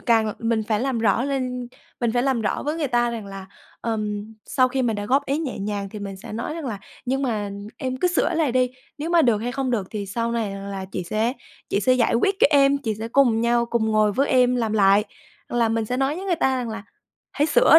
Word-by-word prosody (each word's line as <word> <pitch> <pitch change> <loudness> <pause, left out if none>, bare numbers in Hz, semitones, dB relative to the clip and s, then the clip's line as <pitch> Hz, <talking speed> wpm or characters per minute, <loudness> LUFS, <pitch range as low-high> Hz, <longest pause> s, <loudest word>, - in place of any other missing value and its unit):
càng 225 -3 +3
l 210 - -2
mình 225 -1 0
phải 215 -2 +1
làm 260 -2 0
rõ 225 +3 +2
lên, 255 -3 -2 0.3
mình 235 -2 +1
phải 245 0 +2
làm 265 -3 +1
rõ 210 - -1
với 300 +2 -2
người 305 -4 -1
ta 240 -1 +2
rằng 225 -3 -5
là, 195 -1 -8 0.3
ờm, 215 -1 -3
sau 255 -1 +3
khi 260 +1 -1
mình 225 -3 0
đã 205 - -4
góp 275 +5 +2
ý 280 +2 0
nhẹ 285 -9 -3
nhàng 200 0 -3
thì 210 - -7
mình 200 -1 -6
sẽ 200 +2 -10
nói 235 +7 -3
rằng 325 -4 -5
là 220 -5 -3 0.3
"Nhưng 270 +2 0
mà 215 -5 -1 0.3
em 255 -1 -3
cứ 360 +7 +2
sửa 345 - +1
lại 315 -6 +1
đi, 255 0 +2 0.3
nếu 320 +3 -3
mà 340 -2 +5
được 235 -4 +3
hay 240 +3 -3
không 265 0 -1
được 210 -6 0
thì 205 -2 -4
sau 230 +4 -2
này 225 -3 -1
rằng 195 0 -7
là 195 -1 -4
chị 185 - -2
sẽ 215 +7 0 0.4
chị 200 - +1
sẽ 255 - +4
giải 240 -2 +2
quyết 390 +12 +2
cho - - +8
em, 280 -1 +5
chị 225 -6 -2
sẽ 220 +2 -5
cùng 240 -3 +4
nhau 235 0 +2
cùng 235 -1 0
ngồi 215 -1 +3
với 275 +5 +1
em 250 -1 +4
làm 225 -3 0
lại". 200 0 +5 0.4
Hoặc 240 - -2
là 230 - +3
mình 225 0 0
sẽ 250 +3 -2
nói 270 +3 0
với 380 - -6
người 350 -3 +1
ta 265 -3 +2
rằng 245 - -3
là 220 -1 -6 0.5
"Hãy 295 +1 +2
sửa 315 +1 +7
235 Hz, 265 wpm, -23 LUFS, 215-265 Hz, 0.5 s, cho